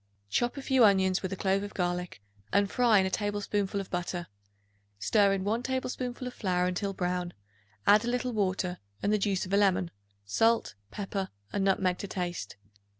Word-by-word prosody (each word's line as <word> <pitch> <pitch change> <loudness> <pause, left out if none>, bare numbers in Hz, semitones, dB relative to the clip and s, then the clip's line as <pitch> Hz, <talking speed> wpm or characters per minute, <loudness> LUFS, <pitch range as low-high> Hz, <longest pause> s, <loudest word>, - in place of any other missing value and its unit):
Chop 240 - +1
a 275 - -5
few 265 -3 +4
onions 190 -3 +4
with 190 - -3
a - - -2
clove 195 +1 +1
of 205 0 -7
garlic 175 - -2 0.3
and 200 0 +2
fry 240 -4 +4
in 190 - +4
a 190 - -1
tablespoonful 205 -1 -1
of 195 - -6
butter. 175 0 -2 0.7
Stir 200 - +3
in 195 -1 0
1 220 +4 0
tablespoonful 255 -1 -3
of 250 - -6
flour 180 -3 0
until 185 +2 -1
brown; 180 -2 -2 0.5
add 210 +2 +6
a - - -3
little 250 0 -1
water 185 -3 -1 0.2
and 205 - +2
the 210 - +2
juice 195 -2 0
of 185 - -6
a - - +5
lemon, 190 -3 +2 0.3
salt, 225 - +2 0.2
pepper 195 - -4 0.2
and 200 - 0
nutmeg 185 -2 +2
to 200 - -4
taste. 175 - -4
195 Hz, 185 wpm, -29 LUFS, 180-210 Hz, 0.7 s, add